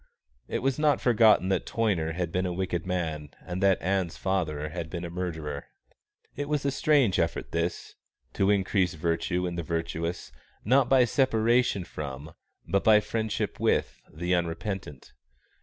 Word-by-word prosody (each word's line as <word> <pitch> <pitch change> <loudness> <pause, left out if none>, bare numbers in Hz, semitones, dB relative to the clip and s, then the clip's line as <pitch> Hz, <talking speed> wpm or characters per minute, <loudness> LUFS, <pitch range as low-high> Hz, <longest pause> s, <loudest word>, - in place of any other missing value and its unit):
It - - -3
was 135 +1 0
not 150 -1 +3
forgotten 110 -6 +4
that 95 -2 0
Toyner 95 -8 0
had 85 -1 -3
been 90 +1 0
a - - -2
wicked 90 -1 -2
man 80 -5 -2 0.2
and 90 +1 -4
that 95 -1 +4
Ann's 95 -2 0
father 75 -6 -1
had 85 0 -5
been 85 +1 -5
a 85 - -6
murderer. 80 -5 -4 0.7
It 145 +1 -4
was 150 -2 0
a 140 - +2
strange 135 -7 +3
effort 85 0 -1
this, 85 +1 -2 0.4
to 95 - +1
increase 95 -3 +2
virtue 85 +3 -1
in 85 -1 -3
the - - -1
virtuous, 85 -2 -3 0.3
not 130 +3 +4
by 130 -2 +6
separation 120 -4 +2
from, 75 -1 -7 0.3
but 100 - +1
by 110 -1 +7
friendship 110 0 -3
with, - - 0
the 85 +4 -2
unrepentant. 85 -3 -3
90 Hz, 155 wpm, -27 LUFS, 85-110 Hz, 0.7 s, by